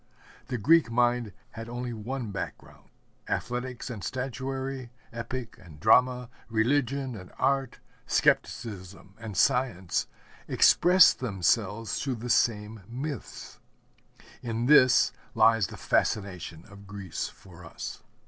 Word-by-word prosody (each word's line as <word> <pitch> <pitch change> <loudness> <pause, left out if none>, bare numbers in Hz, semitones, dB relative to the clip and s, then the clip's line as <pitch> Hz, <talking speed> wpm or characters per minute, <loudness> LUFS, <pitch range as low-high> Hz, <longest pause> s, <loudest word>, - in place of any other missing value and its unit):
The 125 - -2
Greek 160 +7 +4
mind 120 -1 +1 0.2
had 115 +1 -8
only 120 0 -4
one 115 +1 -5
background. 100 - -8 0.4
Athletics 125 0 -3
and 105 -5 -7
Statuary, 135 0 -4 0.2
Epic 120 0 -6
and 80 -5 -14
Drama, 125 +3 +3 0.2
Religion 130 +3 0
and 90 -3 -11
Art, 135 -2 0 0.3
Skepticism 95 -3 -1
and 110 -4 -7
Science 95 -9 +1 0.4
expressed 180 +1 +6
themselves 105 -1 0
through 135 -2 -2
the 120 +1 -4
same 105 -2 +1
myths. 135 +2 -6 0.8
In 115 -1 -2
this 130 -3 +6 0.2
lies 115 -4 +4
the - - -10
fascination 90 -5 -1
of 100 -1 -14
Greece 95 -3 -5
for 90 -2 -15
us. 80 - -8
115 Hz, 110 wpm, -28 LUFS, 105-130 Hz, 0.8 s, expressed